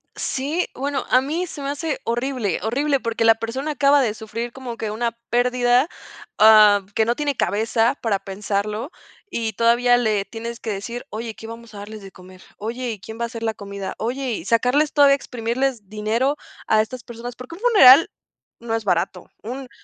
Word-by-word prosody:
Sí, 295 +7 -2
bueno, 280 +1 -2
a 255 - +5
mí 325 +7 -2
se 295 - -8
me 275 - -3
hace 290 +1 -3
horrible, 240 -4 -1
horrible, 275 +5 +1
porque 230 -1 -2
la 225 0 +6
persona 260 +7 -4
acaba 285 -1 +4
de 220 -5 0
sufrir 230 +2 -6
como 255 -2 -7
que 220 -2 -4
una 230 +1 -2
pérdida, 245 +2 +3 0.5
ah, 210 -2 +7
que 220 - +3
no 235 +1 +1
tiene 290 -3 -2
cabeza 225 +4 +1
para 210 -4 0
pensarlo, 205 - -3 0.4
y 225 -6 -2
todavía 240 +2 +4
le 215 -4 +1
tienes 230 +1 -7
que - - -6
decir: 235 +5 -6
"Oye, 225 +1 -5
¿qué 225 - -11
vamos 230 0 -10
a - - -10
darles 210 +1 -8
de 195 -1 -11
comer? 185 0 -15
Oye, 240 +3 -4
¿y 210 - -7
quién 220 +3 -9
va 235 - -1
a - - 0
hacer 230 -1 -8
la 225 - 0
comida? 200 -2 -7
Oye". 250 +3 -2
Y - - -9
sacarles 250 +7 +2
todavía 280 -1 +6
exprimirles 240 -3 -2
dinero 220 +7 0 0.3
a 215 0 +4
estas 245 +3 -6
personas, 240 +1 -8
porque 250 +7 -9
un 395 - -14
funeral 330 - +8 0.5
no 230 -1 -3
es 225 - -3
barato, 180 -1 -1
un 255 +3 -6
235 Hz, 190 wpm, -22 LUFS, 215-260 Hz, 0.5 s, funeral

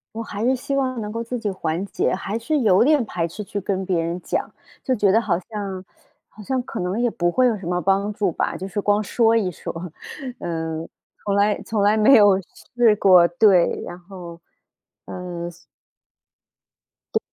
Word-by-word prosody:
我 230 - -3
还 215 -1 -5
是 260 +2 +3
希 265 +2 -4
望 255 -3 -1
能 210 -1 -5
够 230 +1 -3
自 245 +2 -4
己 220 - -3
缓 170 -1 -2
解， - - -1
还 195 +3 -3
是 300 +7 0
有 200 -6 +4
点 290 0 +4
排 170 -5 -2
斥 210 +6 -7
去 205 +1 -4
跟 190 0 -2
别 180 -3 +1
人 170 +2 -3
讲。 - - -2 0.3
就 260 - -1
觉 205 -4 +3
得 225 - +4
好 200 -7 0
像 195 -1 -6 0.4
好 215 - -14
像 260 +5 -1
可 - - -6
能 180 +5 -2
也 245 - +2
不 175 -4 0
会 255 +7 +3
有 235 -3 +2
什 190 - -9
么 180 +1 0
帮 195 +2 +1
助 205 -2 0
吧， - - -2
就 190 - -6
是 205 +2 -3
光 205 +1 +2
说 225 +1 +2
一 200 -5 +1
说， - - -7 0.7
嗯， 160 -1 -4 0.4
从 200 - 0
来 205 +1 +2
从 215 -2 -1
来 205 +2 +4
没 220 +5 +6
有 205 -5 +6 0.4
试 230 -3 +5
过， 185 -4 +6
对， 180 0 +3
然 175 - -7
后， 175 -2 -11 0.7
呃， 175 -1 -6
所 170 - -18 1.6
对。 - - +4
200 Hz, 210 characters per minute, -22 LUFS, 180-225 Hz, 1.6 s, 没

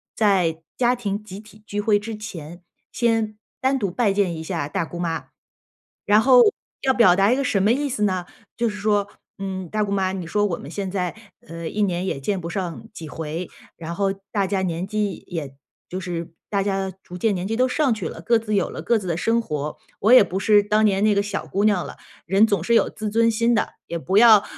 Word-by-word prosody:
在 180 -7 +2 0.2
家 245 0 +3
庭 210 -3 -3
集 195 -1 -9
体 215 0 -16
聚 205 - -3
会 205 0 +3
之 220 +1 -6
前， 175 -5 -8 0.3
先 225 -3 0 0.2
单 265 +1 +2
独 200 -7 -1
拜 210 +1 +2
见 195 -4 +1
一 160 - -6
下 160 -3 -3
大 160 - -1
姑 175 +2 -8
妈。 165 -2 -2 0.8
然 205 +1 +5
后 250 +1 +7 0.4
要 265 - +3
表 225 -8 +6
达 195 +4 +4
一 - - +4
个 275 - 0
什 200 -6 +1
么 210 - +4
意 285 +4 +1
思 245 -5 -4
呢， 185 -3 0 0.3
就 235 0 +1
是 210 - -6
说， 205 -1 +1 0.3
嗯， 190 -2 -5
大 215 +3 0
姑 200 - -3
妈， 190 -1 0
你 185 -3 -4
说 205 +5 +1
我 170 - -2
们 140 - -9
现 195 +1 -3
在， 180 -2 -2 0.3
呃， 165 -1 -6
一 210 - 0
年 180 -3 0
也 140 - -2
见 190 +7 -2
不 170 - -5
上 185 +3 -4
几 165 -7 -9
回， 160 +3 -5 0.3
然 170 0 -6
后 195 +2 +1 0.2
大 200 -2 +1
家 190 -1 0
年 175 +1 -2
纪 210 -2 -1
也 145 -6 -5 0.3
就 185 - -4
是 170 -2 -5 0.2
大 200 -1 +1
家 195 -1 -1
逐 180 - -9
渐 215 +3 +1
年 180 +1 -3
纪 225 - -1
都 255 +1 +3
上 270 -2 +2
去 195 -7 -4
了， - - -9
各 230 +6 +3
自 215 -2 -2
有 195 - +1
了 - - -6
各 235 - +2
自 185 - -7
的 170 -1 -1
生 230 +5 +1
活， 150 -7 -4 0.2
我 220 +4 +4
也 255 - +9
不 190 0 -3
是 205 0 +5
当 210 +1 +2
年 195 -1 +2
那 215 -1 +4
个 200 - +3
小 205 - -4
姑 200 - -1
娘 200 -5 +2
了， - - -9 0.3
人 195 +4 +5
总 200 -6 0
是 235 - +1
有 - - +4
自 215 0 -5
尊 230 +2 +3
心 230 +2 +2
的。 - - +1 0.2
也 170 - -3
不 190 +5 0
要， 225 -1 +9
呃， 200 - -13
200 Hz, 255 characters per minute, -23 LUFS, 180-215 Hz, 0.8 s, 也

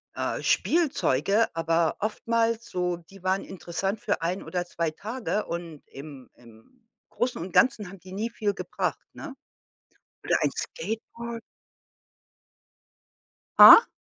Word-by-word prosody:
äh, - - -2
Spielzeuge, 225 - +2
aber 165 0 +1
oftmals 230 +2 -1
so, 180 -1 -2
die 175 +3 -17
waren 190 +1 0
interessant 190 +3 -4
für 220 -7 -2
1 180 +3 -2
oder 180 -1 -3
2 170 -2 -2
Tage 215 +3 -4
und 170 -3 -7
im 140 -2 -11
im 120 - -20 0.2
Großen 245 +1 -2
und 180 - -6
Ganzen 205 0 +3
haben 195 -1 -12
die 185 +2 -13
nie 220 +4 -2
viel 210 -3 -1
gebracht, - - -3
ne? 285 -5 -9 0.9
Oder - - +2
ein - - +2
Skateboard. 235 - -6 2.2
Ha? 460 - +11
195 Hz, 125 wpm, -26 LUFS, 170-230 Hz, 2.2 s, Ha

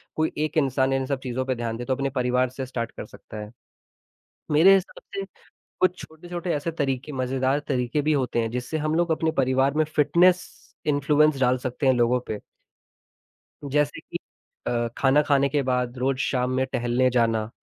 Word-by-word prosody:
कोई 155 0 0
एक 155 +1 -4
इंसान 135 -2 +2
इन 135 0 0
सब 140 -1 -2
चीज़ों 130 0 -2
पे 130 -1 -1
ध्यान 115 -1 -3
दे, 120 - -5
तो 130 - 0
अपने 135 +1 -1
परिवार 125 -1 +1
से 130 +1 -5
स्टार्ट 120 -3 -4
कर - - -8
सकता 110 - -12
है, 105 0 -7 1.0
मेरे 165 +6 +7
हिसाब 190 -1 -2
से 195 - -2 0.6
कुछ 185 0 +3
छोटे-छोटे 175 +3 -6
ऐसे 150 +3 -2
तरीके 140 -2 -2
मज़ेदार 130 +1 0
तरीके 130 +2 0
भी 155 +2 +2
होते 130 -4 0
हैं 115 - -2
जिससे 125 +6 -3
हम 155 +1 -1
लोग 170 +1 +1
अपने 160 0 +1
परिवार 135 +2 +2
में 155 - +3
फिटनेस 170 +5 +3 0.4
इन्फ्लुएंस 145 0 +3
डाल 125 0 +3
सकते 130 +2 -3
हैं 130 - +6
लोगों 120 +1 +2
पे। 105 - -3 1.3
जैसे 150 +1 +1
कि - - -6 0.5
अ, 120 -1 0
खाना 135 +2 +4
खाने 140 -1 +3
के 145 0 +1
बाद 125 -1 0
रोज़ 130 +1 0
शाम 125 -2 0
में 130 - +1
टहलने 120 +2 +2
जाना 115 -3 +1
135 Hz, 185 wpm, -25 LUFS, 125-150 Hz, 1.3 s, मेरे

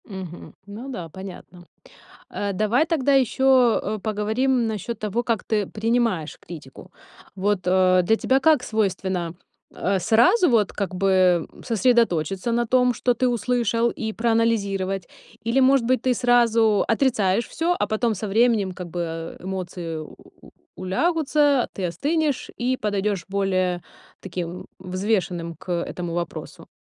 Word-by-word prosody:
Мгм. 185 -4 -9
Ну 215 +6 -8
да, 180 -10 -6
понятно. 180 0 -11 0.6
Э, 200 -1 -3
давай 215 +9 +2
тогда 285 -4 +1
ещё, 260 -2 +4
э, 215 0 -3
поговорим 220 +4 0
насчёт 220 +2 -4
того, 215 +3 -2
как 230 -5 -1
ты 210 -3 -1
принимаешь 225 -7 0
критику. 150 -6 -12 0.4
Вот, 200 +1 0
э, 185 0 +4
для 220 +6 +3
тебя 260 +4 +2
как 295 -2 +4
свойственно, 190 -6 -1 0.4
э, 195 +1 0
сразу 250 - +4
вот 220 -5 +2
как 200 -2 -4
бы 185 -3 +3 0.2
сосредоточиться 230 -4 +1
на 240 +1 +1
том, 250 +1 +3
что 245 +2 +1
ты 255 +1 0
услышал, 235 0 +1
и 220 -1 -4
проанализировать? 200 -5 0 0.4
Или, 235 +4 +2
может 260 -2 +4
быть, 255 +2 +2
ты 255 - +2
сразу 230 -3 +3
отрицаешь 230 -4 +1
всё, 340 +2 0
а - - +1
потом 220 +1 0
со 210 +3 -4
временем 215 -2 +2
как 180 -1 -8
бы 165 -1 -5
эмоции 175 -4 -5 0.7
улягутся, 290 - +1
ты 190 - -3
остынешь 290 - -1
и 255 +1 +1
подойдёшь 205 -3 -1
более 185 -2 0 0.4
таким 180 -1 -6
взвешенным 185 -2 -2
к 180 - -8
этому 175 0 -3
вопросу? 170 -1 -6
210 Hz, 135 wpm, -23 LUFS, 185-245 Hz, 0.7 s, ещё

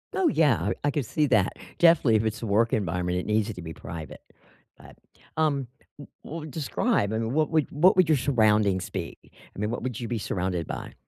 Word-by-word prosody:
Oh, 380 -2 +2
yeah, 135 - +2
er, 95 - -1
I 145 - +2
could 145 -3 -2
see 150 +6 0
that. 110 -7 +2 0.2
Definitely, 165 -9 +5
if 110 +1 +2
it's 110 0 -2
a - - -3
work 110 +2 +2
environment, 90 -2 -1
it 90 - -3
needs 110 0 +1
it 110 - -5
to 90 - -8
be 80 -1 -7
private. 80 -2 -9 0.6
But, - - -16 0.4
um, 140 -5 +1 0.3
w 145 - -11 0.2
well, 160 0 -7
describe 145 - 0
I - - 0
mean, 115 +2 -2
what 155 +1 +1
would 155 -2 +2
what 165 +6 +4
would 185 -4 +4
your 155 - +4
surroundings 105 -7 +2
be? 90 -4 -5 0.4
I - - -9
mean, 105 +1 -1
what 120 - -4
would 125 -3 -4
you 120 - -4
be 120 - -2
surrounded 90 -4 -2
by? - - -6
115 Hz, 220 wpm, -26 LUFS, 100-150 Hz, 0.6 s, Definitely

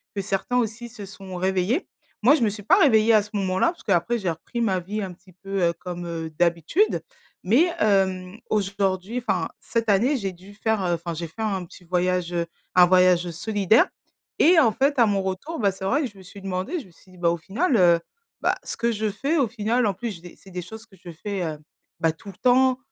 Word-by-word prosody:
que 200 - -1
certains 195 +5 -1
aussi 235 0 -2
se 215 -4 -9
sont 195 -1 -10
réveillés. 190 - 0 0.3
Moi, 255 +7 +6
je 315 - -2
me 225 - +3
suis 205 0 -7
pas 345 - +5
réveillée 230 - +5
à 215 -2 +5
ce 210 - -13
moment-là, 190 - +1
parce 345 - -16
qu'après 195 +5 +1
j'ai 190 -4 -1
repris 165 +9 -5
ma 190 -5 +1
vie 210 +5 -4
un 190 -2 -5
petit 185 +1 -21
peu, 195 +1 -3
heu, 170 - 0
comme, 175 -1 -6
heu, 165 -1 -4
d'habitude. 175 - +2 0.4
Mais, 270 - +4
hem, 190 -2 +1
aujourd'hui 195 +1 -1
enfin - - 0
cette 230 -1 -2
année 235 +9 +3
j'ai 195 -4 -3
dû 185 +3 -15
faire 220 0 0
enfin, 170 -1 -2
j'ai 170 - -4
fait 175 +8 -9
un 195 -5 -1
petit 180 - -16
voyage, 180 0 0
heu, 170 -1 0 0.3
un 180 -1 +8
voyage 180 -1 +4
solidaire 210 - +2 0.5
et 335 +1 +6
en 230 -7 +5
fait, 275 +3 +1
à 235 - +7
mon 200 -2 +1
retour, 190 - -4
bah, 200 -3 +3
c'est 190 0 -7
vrai 275 +10 +2
que 265 - -1
je 205 - -20
me 190 - -13
suis 195 +2 -12
demandé, 195 - -3
je - - -10
me - - -20
suis 185 +3 -22
dit: 185 - -16
«Bah, 175 -1 +2
au 170 - -1
final, 230 - 0
heu, 175 -3 +5 0.4
bah, - - +2
ce - - -6
que 235 0 +1
je 215 -1 -1
fais 275 +11 -1
au 270 - +3
final, 230 +2 0
en 200 - +1
plus 235 +4 -4
j'ai 170 - -12
des 175 0 -12
c'est 190 - -17
des 180 - -4
choses 220 +6 -10
que 200 -5 -20
je 175 - -9
fais, 190 +3 -4
heu, 155 -2 -4 0.4
bah 165 -1 +2
tout 160 +5 -17
le 190 - -12
temps, 255 +1 +4
195 Hz, 240 wpm, -24 LUFS, 180-230 Hz, 0.5 s, un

